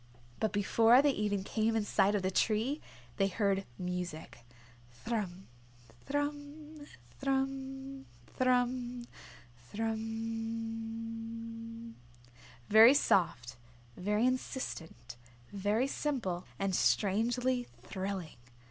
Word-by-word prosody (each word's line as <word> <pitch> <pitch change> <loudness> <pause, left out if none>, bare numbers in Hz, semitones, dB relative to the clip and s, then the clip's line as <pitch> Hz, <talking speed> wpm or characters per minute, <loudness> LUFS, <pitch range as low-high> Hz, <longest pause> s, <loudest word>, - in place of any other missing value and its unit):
But 220 - +1
before 225 +5 +5
they 290 - +5
even 205 -5 -1
came 220 +2 0
in 220 -2 +1
sight 200 0 +3
of 200 - 0
the 185 - +1
tree 225 +9 +1 0.4
they 195 - +3
heard 195 -1 0
music. 180 -3 -4 0.5
"Thrum, 190 - -4 0.6
thrum, 290 +1 -4 0.3
thrum, 270 0 -2 0.3
thrummmm, 250 -1 +1 0.7
thrummmmmmmmmmmm." 225 +1 -4 0.7
Very 225 +5 +9
soft, 125 - +2 0.4
very 210 +5 +1
insistent, 165 - -3 0.4
very 205 +5 +1
simple 245 -11 -2
and 195 -1 -1
strangely 245 +7 +2 0.2
thrilling. 190 -6 -4
225 Hz, 85 wpm, -33 LUFS, 200-255 Hz, 0.7 s, Very